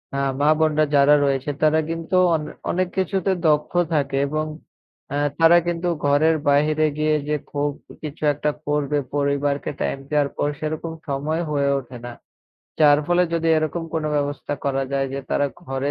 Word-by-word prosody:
আ - - -1 0.2
মা-বোনরা 155 0 +3
যারা 140 +1 +6
রয়েছে 135 0 -1
তারা 155 +1 +4
কিন্তু 165 +2 -3 0.2
অন 155 - -2 0.3
অনেক 185 0 0
কিছুতে 190 0 0 0.2
দক্ষ 150 0 +1 0.2
থাকে 140 -2 0
এবং 155 +2 -2 0.7
অ্যা 145 - -1 0.2
তারা 165 +1 +7
কিন্তু 175 +1 -1 0.2
ঘরের 150 +3 +4
বাহিরে 155 +2 +3
গিয়ে 155 0 +2
যে 150 - +1 0.2
খুব 145 0 0 0.3
কিছু 155 0 -7
একটা 150 +1 -1 0.2
করবে 150 0 0 0.2
পরিবারকে 140 0 0
টাইম - - -1
দেওয়ার 145 -2 +1
পর - - +1
সেরকম 155 +1 -4 0.2
সময় 150 +4 -1
হয়ে 140 -1 +1
ওঠে 125 -1 -10
না। 120 - -6 0.7
যার 145 -1 +6
ফলে, 175 +1 +3
যদি 165 0 0
এরকম 155 +2 -2
কোনো 155 -1 -1
ব্যবস্থা 145 0 -2
করা 135 -1 0
যায় 135 0 0
যে, 140 - -3
তারা 145 - +2 0.2
ঘরে 135 -1 -2
150 Hz, 160 wpm, -22 LUFS, 140-155 Hz, 0.7 s, তারা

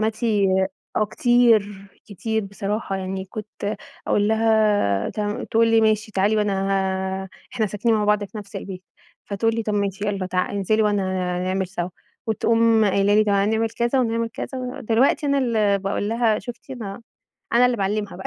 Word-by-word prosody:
حماتي 220 -2 +1 0.5
آه 215 - +3
كتير، 220 -5 +2 0.2
كتير 220 +2 -2
بصراحة، 200 0 -3
يعني 190 0 -4
كنت 210 +1 -6 0.3
أقول 205 0 +2
لها 215 - +2
تمام، 210 -1 -3
تقول 225 0 +2
لي 225 0 +4
ماشي 215 0 +1
تعالي 200 +3 +2
وأنا 210 -1 +1 0.7
ه - - -10 0.3
إحنا 220 - +1
ساكنين 210 +3 0
مع 210 -1 +1
بعض 210 0 +2
في 200 +2 -9
نفس 200 -1 -9
البيت 185 -2 -7 0.4
فتقول 225 +3 0
لي 230 - -1
طب 210 -1 -2
ماشي 200 0 -1
يلّا 195 -2 -2
تعا 185 0 -1
انزلي 205 +2 +1
وأنا 205 -2 +1 0.4
هنعمل 185 +1 -1
سوا 175 -1 -4 0.4
وتقوم 225 0 +3
قايلة 200 +1 +3
لي 215 0 +5
تعالي 200 +1 +2
نعمل 225 0 0
كذا 240 +3 +1
ونعمل 230 -1 0
كذا، 230 - -6
ودلوقتي 255 +3 +1
أنا 280 0 +2
اللي 215 -6 +2
باقول 195 +1 -2
لها 225 -1 +2
شوفتِ 245 +2 -10
أنا 225 -3 -7 0.5
أنا 245 +1 +5
اللي 245 -1 0
باعلمها 205 -1 -2
بقى 190 - -6
210 Hz, 170 wpm, -22 LUFS, 200-225 Hz, 0.7 s, لي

